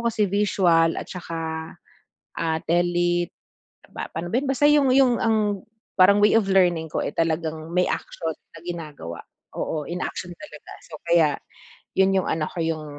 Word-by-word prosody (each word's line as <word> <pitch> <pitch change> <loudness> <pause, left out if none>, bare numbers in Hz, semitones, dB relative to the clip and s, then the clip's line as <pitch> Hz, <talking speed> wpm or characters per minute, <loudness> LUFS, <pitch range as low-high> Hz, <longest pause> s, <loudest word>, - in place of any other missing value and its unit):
kasi 210 -1 +1
visual 180 -5 +2
at - - -6
saka, 170 -2 -6 1.0
ah, 160 -1 -1
telip 175 0 +1 0.6
pa - - -5
pano 175 +5 -6
ba - - +2
'yun? 280 - -4
Basta 275 +2 +2
'yung 295 -2 +5
'yung 255 -2 +4
ang 210 -3 +1 0.4
parang 200 +2 +6
way 210 - +6
of 200 - -3
learning 175 -4 +3
ko, - - -2
eh, - - -3
talagang 160 0 -2
may 180 - +4
actual 165 -2 -3 0.2
na - - -10
ginagawa. 150 - -7 0.4
Oo, 155 -2 -2
in 175 +4 -5
action 175 0 -5
talaga. 300 - -12 0.2
So, - - -9
kaya, 170 -4 +3 0.6
'yun 190 0 +4
'yung 190 -2 +1
ano 160 -1 0
ko, 170 - -5
'yung 160 -1 -2
175 Hz, 165 wpm, -24 LUFS, 165-200 Hz, 1.0 s, parang